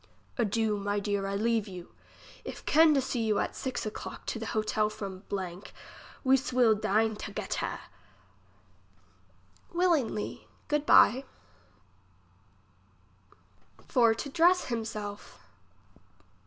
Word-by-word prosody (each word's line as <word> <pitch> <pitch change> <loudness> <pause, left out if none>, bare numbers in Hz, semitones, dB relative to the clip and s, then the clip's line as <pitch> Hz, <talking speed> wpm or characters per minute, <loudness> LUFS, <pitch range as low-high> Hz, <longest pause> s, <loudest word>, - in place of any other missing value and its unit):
Adieu, 220 -2 0
my 205 0 -1
deer, 200 -1 -1
I 195 - -2
leave 225 0 +1
you. 180 -2 -10 0.5
If - - -8
can 315 0 +5
to 275 - +3
see 245 -2 -2
you 215 -2 +1
at - - -1
six 260 -3 -4
clock - - -8
to - - -3
the 225 - -5
hotel 215 -1 0
from, 195 -3 -7 1.0
we 265 0 +5
swill 250 -3 +3
dine 215 +1 +1
togetter. 210 0 -4 1.9
Willingly. 335 -12 0 0.2
Good 295 0 0
by. 260 +4 +6 2.6
For 230 -3 +4
to 255 - -5
dress 345 +5 +4
him 230 -2 -3
self. 205 -2 -7
225 Hz, 110 wpm, -29 LUFS, 205-260 Hz, 2.6 s, by